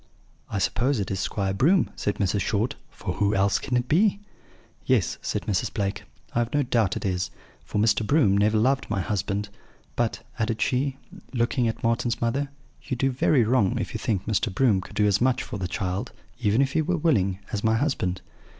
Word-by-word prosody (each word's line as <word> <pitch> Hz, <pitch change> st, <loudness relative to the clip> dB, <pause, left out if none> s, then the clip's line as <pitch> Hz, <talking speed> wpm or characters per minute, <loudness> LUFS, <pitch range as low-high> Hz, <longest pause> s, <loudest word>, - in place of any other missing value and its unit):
"'I 105 Hz, -, -2 dB
suppose 125 Hz, +6 st, +1 dB
it 100 Hz, -, -3 dB
is 95 Hz, -, -1 dB
Squire 95 Hz, 0 st, -1 dB
Broom,' 160 Hz, -, +3 dB
said 105 Hz, -, -1 dB
Mrs. 100 Hz, 0 st, 0 dB
Short; 110 Hz, +5 st, 0 dB, 0.2 s
'for -, -, -5 dB
who 105 Hz, +1 st, +2 dB
else 95 Hz, +1 st, +2 dB
can 125 Hz, -, -1 dB
it 125 Hz, 0 st, -1 dB
be?' 200 Hz, +7 st, +3 dB, 0.6 s
"'Yes,' -, -, +1 dB
said -, -, -2 dB
Mrs. 95 Hz, -3 st, -1 dB
Blake, 100 Hz, -1 st, -2 dB, 0.3 s
'I -, -, +1 dB
have 120 Hz, 0 st, -1 dB
no 145 Hz, -, +3 dB
doubt 115 Hz, -7 st, +1 dB
it -, -, -5 dB
is, 90 Hz, -1 st, -1 dB, 0.3 s
for -, -, -5 dB
Mr. 110 Hz, +1 st, +3 dB
Broom 110 Hz, -5 st, +3 dB
never 105 Hz, +2 st, +3 dB
loved 135 Hz, +5 st, +1 dB
my 105 Hz, -2 st, 0 dB
husband. 100 Hz, +2 st, -2 dB, 0.5 s
But,' 120 Hz, -2 st, -1 dB, 0.2 s
added 110 Hz, 0 st, 0 dB
she, 135 Hz, +3 st, 0 dB, 0.4 s
looking 120 Hz, +1 st, +1 dB
at 115 Hz, -, -3 dB
Marten's 115 Hz, +1 st, +1 dB
mother, 135 Hz, +5 st, 0 dB, 0.3 s
'you 130 Hz, -, -4 dB
do 135 Hz, +2 st, +1 dB
very 130 Hz, 0 st, +3 dB
wrong 110 Hz, -4 st, +2 dB
if -, -, -3 dB
you -, -, -3 dB
think 100 Hz, -4 st, -1 dB
Mr. 110 Hz, 0 st, 0 dB
Broom 105 Hz, -2 st, +3 dB
could 105 Hz, -, -12 dB
do 105 Hz, -1 st, +3 dB
as 105 Hz, +1 st, +2 dB
much 130 Hz, 0 st, +2 dB
for 100 Hz, -, -6 dB
the 90 Hz, -, -2 dB
child 95 Hz, 0 st, -3 dB, 0.3 s
(even 115 Hz, +2 st, +3 dB
if 135 Hz, 0 st, -2 dB
he 160 Hz, -, +3 dB
were 180 Hz, +3 st, 0 dB
willing) 100 Hz, -, +2 dB, 0.2 s
as 105 Hz, -, -2 dB
my 110 Hz, 0 st, +3 dB
husband. 110 Hz, -9 st, -1 dB
110 Hz, 205 wpm, -25 LUFS, 100-130 Hz, 0.6 s, Broom